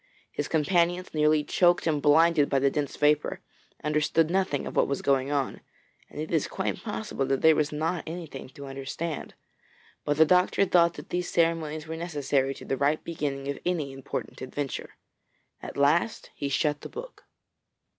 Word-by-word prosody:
His - - -3
companions, 175 +3 +1
nearly 150 0 +3
choked 175 +3 +3
and 155 -3 +1
blinded 155 0 +5
by 140 - +2
the 135 +1 +3
dense 145 -1 -2
vapour, 150 0 +2 0.4
understood 150 +2 +2
nothing 185 -7 0
of - - -6
what - - +3
was 140 - -2
going 135 0 +2
on, 140 -3 -1 0.5
and - - -9
it 155 - -4
is 160 -4 +1
quite - - -3
possible 210 -9 -3
that 135 0 0
there 160 -1 +7
was 150 0 +1
not 160 +3 -1
anything 160 -6 -7
to 140 - -8
understand, 135 +4 -5 0.7
but 145 0 0
the 160 - +7
doctor 180 +3 +3
thought 170 -2 +4
that - - -10
these 180 0 -1
ceremonies 160 -2 0
were 160 +1 -5
necessary 140 -5 0
to - - -11
the 135 - -1
right 145 +3 +1
beginning 140 -4 -3
of 140 - -3
any 165 -6 -1
important 135 -1 -6
adventure. 135 +1 -5 0.7
At - - -8
last 150 +9 +2
he 140 - -3
shut 150 +1 0
the - - -8
book. 485 +3 -9
150 Hz, 175 wpm, -27 LUFS, 140-170 Hz, 0.7 s, there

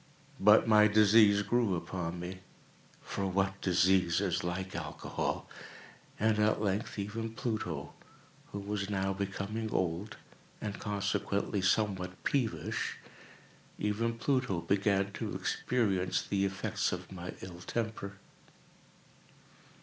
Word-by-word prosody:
But 105 +3 +6
my 105 -1 +7
disease 105 -1 +6
grew 110 -2 +2
upon 85 0 -4
me—for 95 +2 -7
what 95 +1 0
disease 90 -1 +3
is 95 -4 0
like 95 +2 -3
Alcohol!—and 85 +6 -4
at 105 0 +3
length 105 +1 -1
even 110 +3 -4
Pluto, 90 - -3 0.6
who - - -5
was 100 0 -3
now 95 -1 0
becoming 100 +3 -3
old, 90 +3 -1 0.4
and 105 -2 -4
consequently 100 0 -1
somewhat 95 -2 0
peevish—even 115 -2 -3
Pluto 130 -8 +1
began 100 0 +1
to - - -4
experience 95 -7 0
the 100 -1 0
effects 95 0 -1
of 90 0 -5
my 90 -1 -6
ill 90 -2 -8
temper. 110 -1 -3
100 Hz, 105 wpm, -32 LUFS, 95-105 Hz, 0.6 s, my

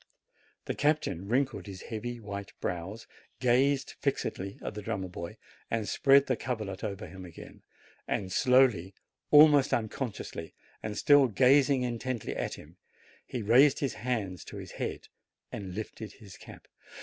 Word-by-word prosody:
The - - -2
captain 145 - 0
wrinkled 135 -1 0
his 95 -2 -8
heavy, 120 +2 -5
white 100 -2 -7
brows, 95 +6 -4 0.3
gazed 130 +3 +2
fixedly 95 +1 -2
at - - -4
the 105 - -6
drummer 100 -3 -3
boy, 85 +4 -7 0.3
and 110 -2 -1
spread 140 0 +5
the 130 - +1
coverlet 110 -6 -4
over 105 0 -4
him 95 -2 -10
again, 85 -3 -12 0.5
and 95 -2 -2
slowly, 120 -7 +3 0.3
almost 145 -2 +7
unconsciously, 110 -7 -5 0.3
and 105 -1 -4
still 145 -2 +6
gazing 130 +3 +4
intently 120 -1 -3
at - - -3
him, 80 +4 -15 0.5
he 120 - -4
raised 130 +7 +6
his 140 -3 -1
hand 105 -7 -3
to - - -8
his - - -8
head, - - -5 0.4
and 95 -3 -6
lifted 110 0 -6
his 100 -4 -13
cap. - - -13
110 Hz, 145 wpm, -30 LUFS, 100-130 Hz, 0.5 s, almost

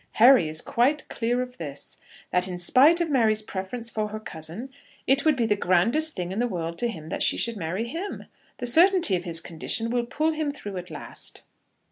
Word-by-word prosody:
Harry 235 - +6
is 155 +1 -1
quite 270 +5 +1
clear 245 +2 -1
of 250 0 -12
this, 140 -3 -7 0.3
that 180 +1 +2
in 180 -1 -5
spite 270 - +5
of 340 - 0
Mary's 220 -5 +2
preference 215 +4 -5
for 215 -2 -1
her 215 +1 -6
cousin, 175 +7 -7 0.3
it 270 +1 +2
would 310 -2 +4
be 240 -3 0
the 210 -2 +2
grandest 230 - +1
thing 180 0 -4
in 195 - -3
the 245 - +1
world 170 -5 -4
to 240 - +2
him 160 -9 -7
that - - -4
she - - +3
should 235 -1 +1
marry 185 +4 -3
him. 340 +11 -6 0.3
The - - -4
certainty 335 - +5
of 175 +1 -4
his 165 -2 +4
condition 200 +8 -3
will 240 -1 -1
pull 305 +5 0
him 310 -1 -2
through 205 -8 -7
at 180 0 -7
last." - - -8
225 Hz, 210 wpm, -25 LUFS, 180-265 Hz, 0.3 s, Harry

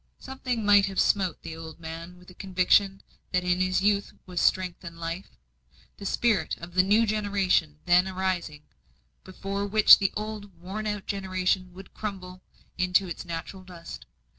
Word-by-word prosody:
Something 255 -4 -4
might 205 -1 +6
have 195 -1 -3
smote 190 -5 +1
the 160 - -7
old 160 0 -10
man 165 +2 -8
with 180 0 -18
a - - -15
conviction, 195 +1 +2 0.3
that 180 -1 +1
in 180 0 +1
this 185 0 +1
youth 205 0 +1
was 180 -1 -3
strength 185 -1 +1
and 170 -1 -9
life, 170 +3 -6 0.6
the 200 - -5
spirit 215 -8 +1
of 170 +1 -10
the 185 - +5
new 210 +4 +3
generation 200 - +1
then 180 +2 +4
arising, 185 -5 -3 0.6
before 195 +2 -4
which 215 +1 +8
the 195 -1 +1
old 210 -4 -7
worn 200 +5 -5
out 210 -2 -3
generation 185 -1 -1
would 190 +1 -13
crumble 185 -3 -6 0.4
into 185 +1 +3
its 175 - -6
natural 170 +3 -6
dust. 170 - -10
185 Hz, 165 wpm, -27 LUFS, 180-200 Hz, 0.6 s, which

